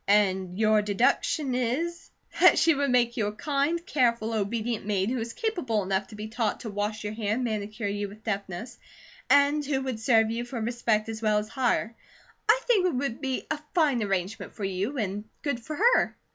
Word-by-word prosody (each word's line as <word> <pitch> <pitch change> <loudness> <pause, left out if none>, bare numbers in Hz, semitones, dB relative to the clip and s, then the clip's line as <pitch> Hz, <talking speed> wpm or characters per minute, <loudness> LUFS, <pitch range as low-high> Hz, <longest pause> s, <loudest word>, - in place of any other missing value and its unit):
"And 190 -3 +2
your 215 0 +4
deduction 255 +8 +1
is 265 +8 -2
" - - -11
"That - - +8
she 330 - +5
would 285 -1 0
make 240 -1 +2
you 215 -3 +1
a - - -2
kind, 295 +7 -1
careful, 235 - +1
obedient 220 +2 -1
maid, 200 +1 0
who 255 - -1
is 230 +1 -4
capable 315 - -1
enough 190 +1 -1
to 220 - -11
be 210 +1 -6
taught 225 -1 -2
to 220 - -5
wash 210 +2 -3
your 210 0 -3
hair 215 -1 -1
and 255 - -2
manicure 215 -1 -3
you 205 0 -2
with 215 +2 -14
deftness, 200 +1 -4 0.5
and 285 +1 +4
who 280 -1 0
would 255 -4 -3
serve 225 -1 +3
you 235 +1 -2
for 240 0 -5
respect 225 -1 0
as 220 0 -5
well 215 -1 +2
as 210 0 -2
hire. 240 -3 0 0.5
I - - +5
think 410 -7 +3
it 345 - -1
would 260 0 -2
be 265 -2 -2
a 310 - -1 0.2
fine 295 -8 +3
arrangement 195 0 -2
for 210 - -6
you 195 +8 -2
and 205 -2 -2 0.2
good 280 -5 -1
for 305 +6 -6
her." 470 +9 +3
225 Hz, 205 wpm, -27 LUFS, 210-270 Hz, 0.5 s, That